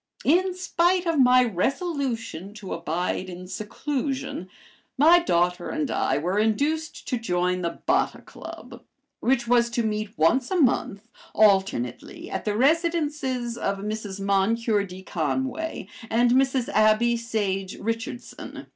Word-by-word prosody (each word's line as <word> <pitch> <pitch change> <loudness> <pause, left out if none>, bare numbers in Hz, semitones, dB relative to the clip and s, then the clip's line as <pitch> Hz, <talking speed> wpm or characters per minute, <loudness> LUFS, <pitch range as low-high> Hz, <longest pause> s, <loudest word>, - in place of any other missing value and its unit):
In 360 +5 +3
spite 360 0 +1
of 330 -3 +1
my 255 -1 +6
resolution 230 - -2
to 205 -3 -6
abide 170 +3 -2
in 180 0 -8
seclusion, 265 - -4 0.5
my 325 +6 +7
daughter 175 - 0
and 310 -3 -2
I - - +1
were 180 +7 0
induced 290 +9 -1
to 250 - -1
join 180 -3 0
the 170 -1 -3
Botta 365 +4 +1
Club, - - -11 0.4
which 240 -2 +1
was 235 0 +4
to 235 0 -1
meet 215 -1 -3
once 240 +12 +3
a 375 - 0
month, 230 -6 +1 0.3
alternately, 190 - +1
at - - -4
the 210 -1 0
residences 290 -5 0
of 195 0 -1
Mrs. 205 -1 -5
Moncure 205 +2 +1
D. 185 0 -10
Conway 265 - -2 0.2
and 240 +2 +3
Mrs. 260 -1 +2
Abby 215 +2 +3
Sage 205 -5 -2
Richardson. 230 +3 -5
230 Hz, 130 wpm, -25 LUFS, 195-270 Hz, 0.5 s, my